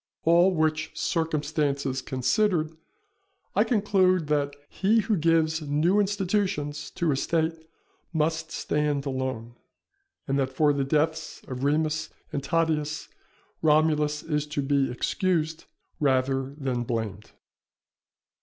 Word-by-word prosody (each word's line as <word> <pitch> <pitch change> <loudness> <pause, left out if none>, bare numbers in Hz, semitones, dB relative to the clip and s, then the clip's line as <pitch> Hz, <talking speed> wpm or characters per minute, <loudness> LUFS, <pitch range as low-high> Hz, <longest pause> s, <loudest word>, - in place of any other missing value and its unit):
All 170 +3 +5
which 155 -2 0
circumstances 150 -4 -1
considered, 155 - 0 0.8
I - - +5
conclude 190 -6 +2
that 145 -1 0
he 215 +7 +2
who 215 +1 0
gives 160 -1 +2
new 155 +7 +2
institutions 190 -7 -1
to 170 -3 +1
a - - +1
State 160 +2 -1 0.4
must 160 0 0
stand 150 -2 -1
alone; 130 -4 -3 0.7
and 135 0 +1
that 135 -1 +1
for 145 +2 +3
the 140 -1 0
deaths 155 +2 -1
of 130 0 -5
Remus 155 +2 +1 0.2
and 140 - -2
Tatius, 155 -1 0 0.5
Romulus 150 -1 +2
is 150 -2 -1
to 145 -1 -2
be 140 -1 +2
excused 160 +4 -1 0.3
rather 135 -1 +1
than 130 -4 -2
blamed. 110 -4 -4
150 Hz, 115 wpm, -26 LUFS, 140-165 Hz, 0.8 s, All